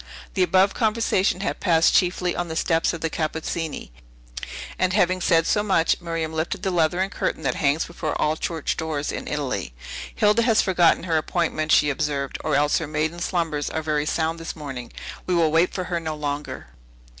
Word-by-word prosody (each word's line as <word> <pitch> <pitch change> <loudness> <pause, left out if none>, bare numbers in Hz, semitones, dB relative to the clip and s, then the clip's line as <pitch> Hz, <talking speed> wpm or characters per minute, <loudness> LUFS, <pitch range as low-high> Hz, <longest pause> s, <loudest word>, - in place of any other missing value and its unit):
The 190 - 0
above 190 +2 +4
conversation 215 -5 +1
had - - -2
passed 165 -3 +4
chiefly 180 -1 +2
on 175 - -2
the 160 - -5
steps 165 0 +2
of 165 - -6
the 165 - 0
Cappuccini; 160 - -3 0.9
and, 185 -1 +2
having 185 -2 +2
said 165 -1 +3
so 210 - +2
much, 190 -6 +2
Miriam 165 -2 -3
lifted 160 +1 -2
the 190 - 0
leathern 175 +3 +1
curtain - - -2
that - - +1
hangs 145 +1 +1
before 165 -2 -4
all 155 +1 +2
church 160 -1 -2
doors 155 -3 -2
in - - -5
italy. 140 - -3 0.4
"Hilda 210 +2 +3
has 225 -2 +3
forgotten 175 -4 +3
her 165 -3 +1
appointment," 155 -1 -1
she 150 -1 +5
observed, 140 -1 -2
"or 155 - +1
else 145 +1 +3
her 160 - -4
maiden 155 +3 -2
slumbers 165 -5 -1
are 160 - -3
very 150 -1 0
sound 165 +1 0
this 165 - -6
morning. 135 -6 -7 0.4
We 180 - +1
will 165 -2 +3
wait 165 +3 +3
for 185 - -3
her 175 -1 -2
no 160 -2 -4
longer." 145 -1 -4
165 Hz, 190 wpm, -24 LUFS, 155-180 Hz, 0.9 s, she